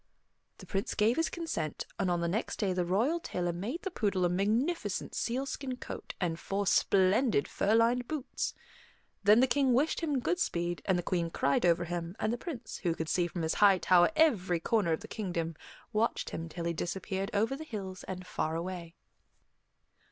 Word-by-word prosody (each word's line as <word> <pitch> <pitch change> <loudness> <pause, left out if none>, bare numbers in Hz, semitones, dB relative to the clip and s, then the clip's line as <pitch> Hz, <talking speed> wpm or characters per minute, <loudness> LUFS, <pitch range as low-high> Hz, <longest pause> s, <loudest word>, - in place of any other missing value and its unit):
The - - -11
Prince 200 +5 -2
gave 220 +4 +3
his 325 - +2
consent, 325 - -3
and 190 - +1
on 175 -1 +1
the 170 - 0
next 200 +7 -2
day 195 -4 0
the 180 -1 0
royal 225 - +1
tailor 175 - -2
made 225 - -4
the 385 - -3
poodle 200 - +1
a - - +3
magnificent 210 - 0
sealskin 260 +1 -2
coat - - -7
and 170 -3 -1
four 200 +1 -2
splendid 195 - +3
fur 210 +2 +1
lined 240 +2 +3
boots. 295 -4 -3 0.7
Then 210 +4 +7
the - - +6
King 265 0 +2
wished 285 +6 +2
him 295 -5 0
good 360 +8 0
speed, 175 - -1
the 180 -3 +2
Queen 170 -2 0
cried 140 +2 +2
over 170 0 +3
him, 175 +1 -4
and 215 +2 0
the 240 - -3
Prince, 270 -7 -6
who 170 -4 -1
could 160 -1 -4
see 175 -1 +2
from 175 -1 -4
his 160 - +1
high 200 -2 +7
tower 180 -1 +5
every 200 - +3
corner 205 -1 +1
of 160 - 0
the - - -9
kingdom, 170 -6 -3 0.4
watched 220 +2 0
him 165 0 -5
till 170 +1 -5
he 170 - 0
disappeared 190 +4 -3
over 225 +5 +1
the 310 - -7
hills 195 -9 -6
and 185 -1 -6
far 160 -2 -2
away. 170 0 -5
195 Hz, 190 wpm, -31 LUFS, 175-240 Hz, 0.7 s, Then